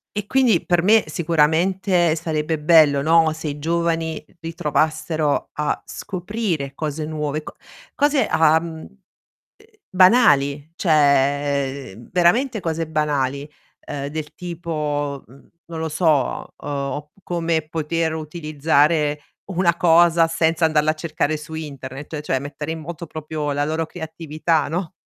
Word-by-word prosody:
E 210 -1 -2
quindi, 245 -7 +2
per 175 -1 +2
me, 215 +4 +5
sicuramente 170 +2 +2
sarebbe 160 -1 -2
bello, 150 -3 +5
no, 160 0 +4
se 160 0 -6
i 145 0 -6
giovani 165 0 -1 0.2
ritrovassero 160 -1 -1
a 150 0 -2
scoprire 185 -7 -4
cose 155 0 -4
nuove, 150 -1 -3
co - - -10 0.4
cose, 285 -4 +2
uhm, 160 - +1 0.5
uhm, 200 - -25 0.9
banali, 150 - +4
cioè 140 - +1 0.2
veramente 215 +8 +2
cose 165 -3 -3
banali, 145 -2 -1 0.4
ehm, 140 -1 -4
del 150 0 -6
tipo, 150 -5 -3
mhmm, 135 +4 -18 0.2
non 165 -1 -7
lo 160 0 -2
so, 155 -4 0
uhm - - -9
op 145 +1 -4
come 170 -2 -1
poter 160 0 -1
utilizzare 155 -1 +1 0.3
una 170 -1 +2
cosa 170 -1 +5
senza 165 0 +1
andarla 155 -1 +3
a - - -1
cercare 155 -1 -2
su 155 +1 -9
internet, 145 -1 -7
cioè 135 -3 -1
mettere 145 +2 -5
in 160 - -6
moto 170 +1 -7
proprio 150 -1 -4
la 145 +1 0
loro 160 +2 -2
creatività, 160 -1 -2
no. 170 +3 -3
160 Hz, 130 wpm, -21 LUFS, 150-170 Hz, 0.9 s, me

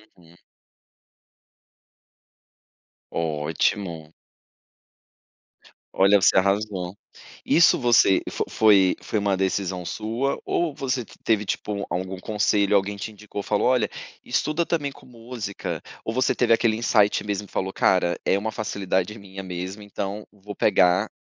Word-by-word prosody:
Uhum. 85 -1 -20 2.8
Ótimo. 80 +1 -2 1.8
Olha, 100 +2 +4
você - - +5
arrasou. 100 -1 0 0.5
Isso 170 - +5
você 120 -5 +4
fo - - -3
foi 100 -4 +4
foi 110 - -2
uma 100 -1 +1
decisão 95 -1 -1
sua, 115 +8 -2
ou 170 -4 0
você 135 -3 -2 0.2
teve 105 -2 +1
tipo 100 0 -3
algum 95 +1 -3
conselho, 105 0 +1
alguém 100 +1 +1
te 100 +2 -6
indicou 105 -1 -7
e - - -11
falou: 105 +2 +1
"Olha, 125 -1 +2 0.3
estuda 160 +2 0
também 145 -4 -1
com - - -17
música.". 115 -4 -6 0.2
Ou 110 - -2
você 130 -1 +2
teve 120 -2 +3
aquele 115 -1 +2
insight 105 -3 +2
mesmo 105 0 -3
e - - -22
falou: 95 0 -2
"Cara, 90 -2 +2
é 95 - +3
uma 110 +2 -3
facilidade 100 -1 -2
minha 95 -1 -9
mesmo, 90 +3 -6
então 100 0 -5
vou 105 0 -10
pegar 90 +4 +3
100 Hz, 130 wpm, -24 LUFS, 95-110 Hz, 2.8 s, você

